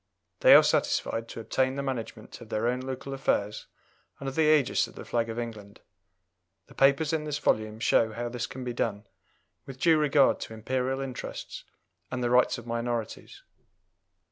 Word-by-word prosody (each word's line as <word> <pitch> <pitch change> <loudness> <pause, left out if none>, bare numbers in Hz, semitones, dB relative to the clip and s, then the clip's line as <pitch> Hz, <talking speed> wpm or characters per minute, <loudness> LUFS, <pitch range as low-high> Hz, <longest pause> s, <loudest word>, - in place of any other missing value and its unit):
They - - +8
are - - +9
satisfied 115 0 0
to - - -7
obtain 130 +3 0
the 140 - -3
management 115 -5 -6
of 115 - -12
their 110 +1 -1
own 125 +1 0
local 130 +1 -6
affairs 105 -6 -1 0.5
under 135 -1 -4
the 155 +3 +2
ægis 150 -4 +3
of - - -16
the - - -9
flag 115 -1 -1
of 115 - -5
England. 110 -4 -7 0.9
The - - -17
papers 140 +3 +3
in 160 -1 0
this 150 -1 -2
volume 110 -6 0
show 115 -1 +3
how 120 +2 -4
this 120 -1 -4
can 130 - -8
be 125 -1 -4
done 105 -3 -2 0.6
with 135 -1 -9
due 160 +1 +4
regard 145 -2 +3
to 110 - -7
Imperial 130 +4 -2
interests 130 -2 -7 0.4
and 125 -1 -3
the 120 - 0
rights 125 0 +4
of 120 - -10
minorities. 115 -1 -4
125 Hz, 175 wpm, -28 LUFS, 115-135 Hz, 0.9 s, are